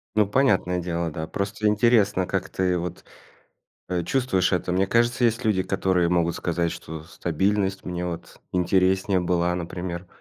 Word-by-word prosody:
Ну 105 -2 +4
понятное 100 -7 +2
дело, 85 -1 -2
да. 80 +1 -5
Просто 100 +2 -3
интересно, 105 -3 +3
как 95 0 -2
ты 90 -1 0
вот, 85 0 -5 0.9
э, 90 -2 -1
чувствуешь 95 -4 +1
это. 90 0 0
Мне 95 +1 +2
кажется, 120 +2 +2
есть 115 +1 +2
люди, 100 -4 +2
которые 95 -2 +1
могут 85 -1 +1
сказать, 85 -1 -1
что 80 -1 -8
стабильность 95 +4 -1
мне 90 0 -3
вот 85 -1 -8
интереснее 95 +1 +2
была, 90 0 +1
например. 90 +1 -5
90 Hz, 155 wpm, -24 LUFS, 85-100 Hz, 0.9 s, Ну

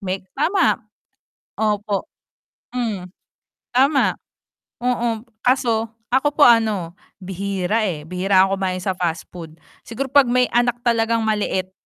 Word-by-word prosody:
May 190 -1 -4
tama. 345 +6 +1 0.8
Opo. 210 -2 -1 0.6
Hmm. 220 -7 -3 0.6
Tama. 270 +3 +2 0.6
Oo, 240 -2 -1 0.2
kaso 235 -3 +1 0.2
ako 265 +3 +3
po 295 - +7
ano, 215 -8 +3 0.3
bihira, 195 +2 -2
eh, 150 -4 -5
bihira 185 +3 +3
ako 195 0 0
kumain 185 -1 -1
sa 190 0 0
fast 170 -2 -2
food. 165 -3 -10 0.3
Siguro 265 +4 -4
'pag 280 -3 +6
may 250 +1 +3
anak 240 0 +2
talagang 230 -1 +1
maliit. 200 -3 -1
220 Hz, 120 wpm, -21 LUFS, 185-245 Hz, 0.8 s, po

